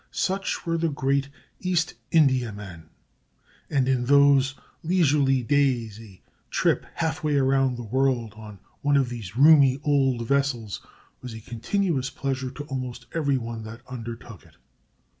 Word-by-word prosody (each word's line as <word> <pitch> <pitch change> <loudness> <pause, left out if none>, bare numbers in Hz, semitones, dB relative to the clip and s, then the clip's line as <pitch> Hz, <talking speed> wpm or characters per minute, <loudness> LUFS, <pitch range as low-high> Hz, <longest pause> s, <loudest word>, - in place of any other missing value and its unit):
Such 195 +1 -2
were 165 -1 0
the 165 0 +1
great 140 -1 0 0.3
East 180 -3 0 0.2
Indiamen; 105 - 0 0.8
and 135 -3 +1
in 130 -2 +1
those 140 -1 +4 0.3
leisurely 145 -7 +2
days 120 -5 +1
a 100 -5 -15 0.3
trip - - +1
half 160 -1 -2
way 150 -2 +1
round 135 -2 +2
the 120 - -6
world 120 -2 0
on 105 -2 -11 0.2
one 145 0 +3
of 135 -3 +1
these 115 -4 -7
roomy 140 -2 +6
old 135 -5 +1
vessels 135 -7 -1 0.4
was 125 -3 -8
a - - -7
continuous 135 - -2
pleasure 135 -1 -3
to 140 +3 -8
almost 130 -3 -6
every 145 -5 +1
one 115 -2 -5
that 115 +2 -9
undertook 115 -4 -8
it. - - -21
135 Hz, 140 wpm, -25 LUFS, 120-145 Hz, 0.8 s, roomy